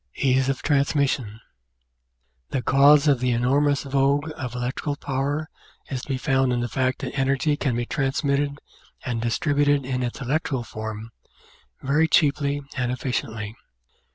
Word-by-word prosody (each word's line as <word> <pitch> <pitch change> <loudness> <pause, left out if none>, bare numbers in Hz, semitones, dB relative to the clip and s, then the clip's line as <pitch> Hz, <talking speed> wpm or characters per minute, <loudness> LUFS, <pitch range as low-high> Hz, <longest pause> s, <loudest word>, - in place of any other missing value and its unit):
Ease 135 0 +2
of 135 - -2
Transmission 140 -6 +1 1.1
The 130 - -2
cause 140 +2 +5
of 140 -4 +4
the 125 0 0
enormous 135 +4 +2
vogue 140 +2 +1
of 125 -2 -5
electrical 125 +4 -2
power 145 +2 -2 0.4
is 130 -2 -2
to - - -11
be 135 -2 -1
found 130 0 +1
in 120 - 0
the 120 - -1
fact 130 +3 -1
that 130 - -4
energy 135 +2 +1
can 135 -4 -1
be 120 0 -1
transmitted 140 +1 0 0.5
and 115 -3 -2
distributed 145 +3 +1
in 130 -1 -2
its 120 -1 -3
electrical 135 -1 -1
form 110 0 -7 0.7
very 150 +4 +3
cheaply 145 -2 +2
and 125 -3 -1
efficiently. 110 -4 -3
135 Hz, 145 wpm, -24 LUFS, 125-145 Hz, 1.1 s, cause